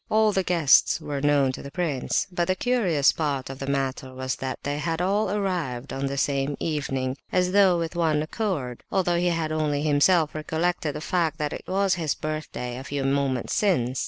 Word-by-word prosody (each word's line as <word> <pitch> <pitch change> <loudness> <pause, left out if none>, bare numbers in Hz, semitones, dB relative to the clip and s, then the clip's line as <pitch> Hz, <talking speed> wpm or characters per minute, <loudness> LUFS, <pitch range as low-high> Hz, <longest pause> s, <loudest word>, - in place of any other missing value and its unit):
All 215 0 +4
the 195 - +1
guests 170 -6 +4
were 145 -2 -4
known 145 -2 +3
to - - -7
the 140 - -8
prince; 145 -4 -1
but 175 -1 0
the 185 - +2
curious 190 - +2
part 140 -4 -2
of 135 - -9
the 135 - -5
matter 135 -1 -2
was 130 0 -3
that 130 -1 -4
they 145 +1 -2
had 165 +1 -2
all 200 +4 +1
arrived 175 -11 -2
on 135 +1 -2
the 140 0 -3
same 140 0 0
evening, 135 -4 -2
as 180 0 +2
though 190 -3 +5
with 165 0 -3
one 160 -3 +1
accord, 155 - -3
although 175 -3 +1
he 180 - +1
had 165 -2 -1
only 150 -2 0
himself 155 +2 +3
recollected 160 0 -1
the - - -5
fact 165 -1 0
that 150 -1 -2
it - - -7
was 195 0 +2
his 155 -3 0
birthday 155 -5 -4
a - - -7
few 140 0 -3
moments 135 -2 0
since. 130 - +1
155 Hz, 200 wpm, -25 LUFS, 135-180 Hz, -, though